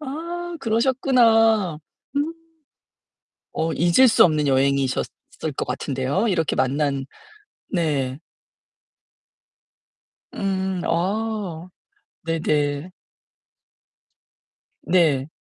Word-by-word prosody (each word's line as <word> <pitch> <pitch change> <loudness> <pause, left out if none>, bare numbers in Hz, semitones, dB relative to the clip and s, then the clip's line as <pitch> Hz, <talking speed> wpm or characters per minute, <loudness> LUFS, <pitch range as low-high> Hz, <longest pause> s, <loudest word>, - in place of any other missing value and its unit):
아, 340 +5 -5
그러셨구나. 225 - +3 0.4
음. 305 +4 0 1.2
어 160 +1 -1
잊을 175 - +4
수 - - +6
없는 155 -3 +1
여행이셨을 135 0 +1 0.5
것 - - -1
같은데요. 135 - -1
이렇게 165 -5 0
만난 140 0 0 0.7
네. 145 -7 -1 2.2
음, 190 -2 -2
아. 190 -1 -2 0.6
네네. 155 -1 -1 1.9
네. 155 -7 +2
175 Hz, 130 characters per minute, -22 LUFS, 145-225 Hz, 2.2 s, 수